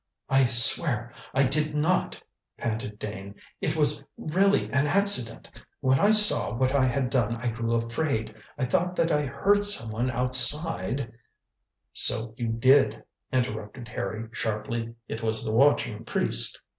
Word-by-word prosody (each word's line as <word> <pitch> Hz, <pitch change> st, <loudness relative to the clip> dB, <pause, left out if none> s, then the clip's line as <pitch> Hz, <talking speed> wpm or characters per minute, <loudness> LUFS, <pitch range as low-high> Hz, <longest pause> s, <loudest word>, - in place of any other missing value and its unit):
"I 135 Hz, 0 st, +3 dB
swear 120 Hz, 0 st, +4 dB, 0.2 s
I 135 Hz, -, +2 dB
did 150 Hz, +3 st, -1 dB
not," 160 Hz, +5 st, -1 dB, 0.4 s
panted 110 Hz, -2 st, -5 dB
Dane; 100 Hz, -1 st, -8 dB, 0.3 s
"it -, -, -1 dB
was 150 Hz, -2 st, 0 dB
really 195 Hz, +6 st, +1 dB
an 140 Hz, +2 st, +1 dB
accident. 145 Hz, -, +1 dB, 0.3 s
When 130 Hz, 0 st, +1 dB
I 205 Hz, -, +3 dB
saw 210 Hz, -, +4 dB
what 130 Hz, +2 st, 0 dB
I 135 Hz, -2 st, +2 dB
had 125 Hz, 0 st, -2 dB
done 115 Hz, -4 st, 0 dB
I 120 Hz, +1 st, -3 dB
grew 115 Hz, 0 st, -3 dB
afraid. 115 Hz, 0 st, -2 dB, 0.2 s
I 135 Hz, -, -1 dB
thought 180 Hz, +6 st, -1 dB
that 165 Hz, -1 st, 0 dB
I 150 Hz, -1 st, 0 dB
heard 205 Hz, +9 st, +1 dB
someone 120 Hz, -, -2 dB
outside 130 Hz, +1 st, +2 dB, 0.4 s
" -, -, -56 dB, 0.3 s
"So 110 Hz, 0 st, +4 dB
you 120 Hz, -1 st, -4 dB
did," 115 Hz, 0 st, +2 dB, 0.3 s
interrupted 120 Hz, -2 st, -4 dB
Harry 110 Hz, +1 st, -5 dB
sharply; 115 Hz, +1 st, -4 dB
"It 110 Hz, -, -6 dB
was 110 Hz, -1 st, -3 dB
the -, -, -2 dB
watching 115 Hz, -3 st, +1 dB
priest." -, -, 0 dB
125 Hz, 145 wpm, -26 LUFS, 115-145 Hz, 0.4 s, swear